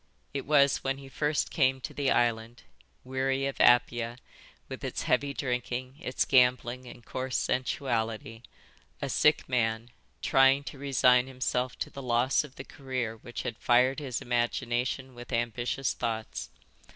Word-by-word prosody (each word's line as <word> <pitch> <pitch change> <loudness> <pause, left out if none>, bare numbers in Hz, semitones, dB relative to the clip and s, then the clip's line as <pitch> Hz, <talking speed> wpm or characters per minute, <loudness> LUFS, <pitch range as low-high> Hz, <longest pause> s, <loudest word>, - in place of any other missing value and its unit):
It 140 -1 -4
was 140 -2 +5
when 135 0 -2
he 135 0 -11
first 150 +3 -1
came 130 -3 +2
to - - -6
the 140 -2 0
island, 115 0 0 0.4
weary 130 +1 -1
of 140 - -2
Apia, 120 -1 +4 0.5
with - - -8
its - - -3
heavy 140 +3 +1
drinking, 125 0 -3
its 150 -7 -1
gambling 125 -1 +3
and 120 -1 -12
coarse 130 0 -3
sensuality, 115 -4 -2 0.6
a - - -3
sick 150 - +3
man, 115 -2 0 0.3
trying 135 +1 +5
to 140 - -9
resign 125 -2 +4
himself 125 -1 -2
to - - -4
the 140 - -8
loss 125 +2 +2
of 145 -3 -12
the - - -7
career 125 -5 -4
which 120 +2 -7
had 115 - -5
fired 125 +4 +3
his 135 -5 -4
imagination 120 +2 -1
with 120 +1 -11
ambitious 120 +2 -1
thoughts. 110 -1 -4
125 Hz, 150 wpm, -29 LUFS, 120-135 Hz, 0.6 s, was